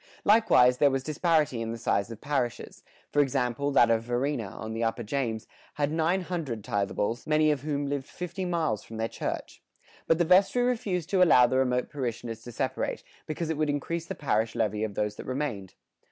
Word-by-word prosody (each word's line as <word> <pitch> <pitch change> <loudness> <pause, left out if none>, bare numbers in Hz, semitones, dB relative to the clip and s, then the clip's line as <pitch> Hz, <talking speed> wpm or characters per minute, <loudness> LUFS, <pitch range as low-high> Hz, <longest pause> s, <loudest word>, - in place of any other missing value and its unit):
Likewise 200 - +5
there 145 - +6
was 135 -1 -1
disparity 155 -5 +1
in 115 0 -3
the 115 - -4
size 100 -2 0
of 115 -2 -8
parishes 140 -5 -2 0.3
for 145 - +4
example, 130 0 0
that 120 -4 +5
of 115 -1 +2
Varina, 120 0 -1
on 110 +3 -7
the 115 +1 -2
upper 115 +1 -1
James, 115 -2 -2 0.3
had 145 0 0
nine 165 +4 +1
hundred 160 - -4
tithables, 100 +4 -2
many 155 0 +4
of 145 -3 -1
whom 145 -1 -2
lived 140 -1 -3
fifty 180 +1 -5
miles 165 - -1
from 110 - -9
their 110 0 -1
church. - - -5 0.5
But 165 - +4
the 175 - +2
vestry 195 +7 +4
refused 195 -8 -1
to 190 -2 +3
allow 140 -8 +7
the 130 +2 +1
remote 125 -1 0
parishioners 120 -4 -4
to 120 - -7
separate, - - -2 0.2
because 160 +1 -3
it 160 - -2
would 155 -1 +1
increase 160 +3 -2
the 190 - -4
parish 110 -7 0
levy 105 -1 0
of 105 -2 -3
those 105 0 -2
that - - -8
remained. 130 -8 -4
140 Hz, 195 wpm, -28 LUFS, 115-160 Hz, 0.5 s, allow